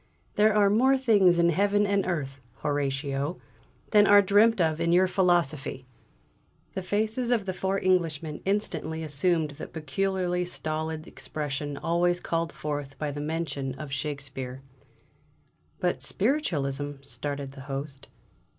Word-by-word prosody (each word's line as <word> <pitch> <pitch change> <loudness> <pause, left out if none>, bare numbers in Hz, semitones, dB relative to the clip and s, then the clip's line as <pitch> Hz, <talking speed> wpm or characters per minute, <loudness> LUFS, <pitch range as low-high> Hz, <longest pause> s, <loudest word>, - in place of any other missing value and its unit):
'There 210 0 +4
are 200 -1 +5
more 260 +5 +4
things 205 -9 +4
in 170 0 +4
heaven 205 +4 +2
and 200 -1 +1
earth, 135 -7 -3 0.2
Horatio, 140 +1 -1 0.5
than 210 -1 +6
are 205 0 +7
dreamt 210 +3 +4
of 160 -1 +1
in 170 0 +2
your 180 +2 +5
philosophy!'" 175 -8 +1 0.9
The 190 - -3
faces 220 +6 0
of 230 -5 +2
the 185 - -2
four 190 +1 -1
Englishmen 165 -5 0
instantly 160 -6 -1
assumed 155 +1 0
that 145 +2 -9
peculiarly 180 +3 -1
stolid 155 -2 -4
expression 145 -3 -5
always 175 +2 +1
called 165 -2 -1
forth 145 -2 -5
by 150 -1 -2
the 145 +1 -5
mention 145 -4 -3
of 150 -1 -8
Shakespeare. 140 -2 -4 1.2
"But - - 0
Spiritualism 145 - -1
" - - -22
started 140 0 -5
the 135 0 -11
Host. 135 0 -5
160 Hz, 135 wpm, -27 LUFS, 145-190 Hz, 1.2 s, are